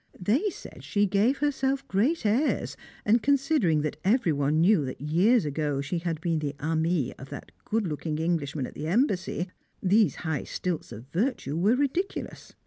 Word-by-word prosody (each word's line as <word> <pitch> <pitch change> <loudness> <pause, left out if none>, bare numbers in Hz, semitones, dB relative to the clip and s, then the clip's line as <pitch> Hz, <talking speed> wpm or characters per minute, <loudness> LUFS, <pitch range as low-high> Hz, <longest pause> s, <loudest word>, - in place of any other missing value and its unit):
They 240 - +1
said - - -11
she 205 0 +1
gave 205 +7 +2
herself 275 -2 0
great 235 - +1
airs, 240 +9 +1 0.3
and 225 +3 +4
considering 270 - +2
that 150 - -3
every 195 -5 +3
one 145 +2 +1
knew 175 -1 +4
that 130 - -6
years 175 - +3
ago 145 -1 -1
she 140 +5 -2
had 165 -2 -3
been 165 -2 0
the 145 -1 -3
amie 160 -2 0
of 135 - -10
that - - -9
good 220 -1 0
looking 155 -1 -3
Englishman 155 -4 -1
at - - -9
the 150 - -5
Embassy 185 - 0 0.3
these 200 +2 +3
high 160 -3 -1
stilts 175 -8 -3
of 115 +1 -9
virtue 195 - -1
were 200 +8 +3
ridiculous. 285 +8 -3
180 Hz, 170 wpm, -27 LUFS, 155-235 Hz, 0.3 s, and